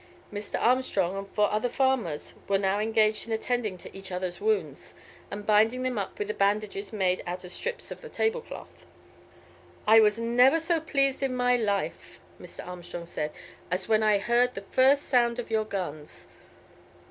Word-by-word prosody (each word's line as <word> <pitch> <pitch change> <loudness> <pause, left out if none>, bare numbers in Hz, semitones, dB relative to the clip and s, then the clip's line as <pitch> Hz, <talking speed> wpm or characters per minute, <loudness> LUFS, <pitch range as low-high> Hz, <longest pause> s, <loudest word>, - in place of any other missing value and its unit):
Mr. 205 0 -4
Armstrong 225 -7 +1
and 195 0 -5
four 210 -1 +1
other 215 +4 0
farmers 255 - 0
were 200 - +3
now 195 +1 +1
engaged 215 0 +1
in 225 - -2
attending 220 -3 -1
to - - -12
each 195 -1 -9
other's 180 0 -4
wounds, 435 0 -1 0.3
and 205 0 -6
binding 220 +4 +3
them 255 -4 -1
up 195 - -5
with 210 +1 -3
bandages 200 0 0
made 190 -4 0
out 180 +1 -4
of 180 - -9
strips 475 - -4
of - - -8
the 480 - -10
table 455 +2 0
cloth. - - -12 1.0
"I 220 +1 +7
was 210 -1 +4
never 245 +6 +4
so 330 +1 0
pleased 275 -4 0
in 265 -2 0
my 250 0 +3
life," 205 -4 -2 0.2
Mr. - - -10
Armstrong 175 -1 -7
said, 150 -2 -3 0.4
"as 180 +1 -2
when 220 -1 +3
I 215 -1 +4
heard 240 +4 +2
the 195 - -5
first 275 +2 +4
sound 240 -2 +3
of 240 -2 -5
your 220 -1 +1
guns. 155 - -6
215 Hz, 175 wpm, -27 LUFS, 195-250 Hz, 1.0 s, I